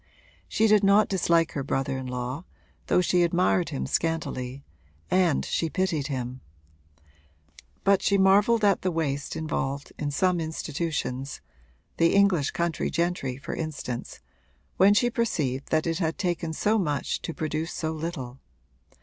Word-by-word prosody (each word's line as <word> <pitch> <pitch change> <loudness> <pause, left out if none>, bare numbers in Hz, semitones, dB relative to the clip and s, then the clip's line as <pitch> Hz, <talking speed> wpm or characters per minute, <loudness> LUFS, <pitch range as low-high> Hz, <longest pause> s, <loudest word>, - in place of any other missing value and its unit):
She 220 - +1
did 215 -1 +5
not 200 +2 +5
dislike 170 -3 +2
her 140 - -3
brother 135 0 -1
in 130 -1 -5
law, 125 +4 -4 0.4
though - - +4
she 180 0 +2
admired 175 +1 +2
him 140 - -3
scantily, 140 -5 -2 0.5
and 180 -4 +3
she 165 - -1
pitied 175 -6 -1
him; 130 -2 -4 1.4
but 195 -1 +4
she 200 - +2
marvelled 205 +4 +4
at 200 -3 +3
the 185 - 0
waste 145 -4 -2
involved 140 -3 -3
in 145 - -1
some 180 +5 +1
human 165 - -1
institutions 150 -4 -3 0.6
(the 165 +2 +3
English 195 -8 +4
country 170 -1 -1
gentry 170 -6 -1
for 140 - -6
instance) 145 -6 -5 0.6
when 200 +2 +6
she 240 +3 +3
perceived 145 - -1
that 155 0 +1
it 165 0 -1
had 165 -2 -1
taken 175 -3 -1
so 215 +7 +1
much 150 -7 -1
to - - -4
produce 155 +1 -3
so 160 -1 -2
little. 155 -6 -5
165 Hz, 150 wpm, -26 LUFS, 140-185 Hz, 1.4 s, when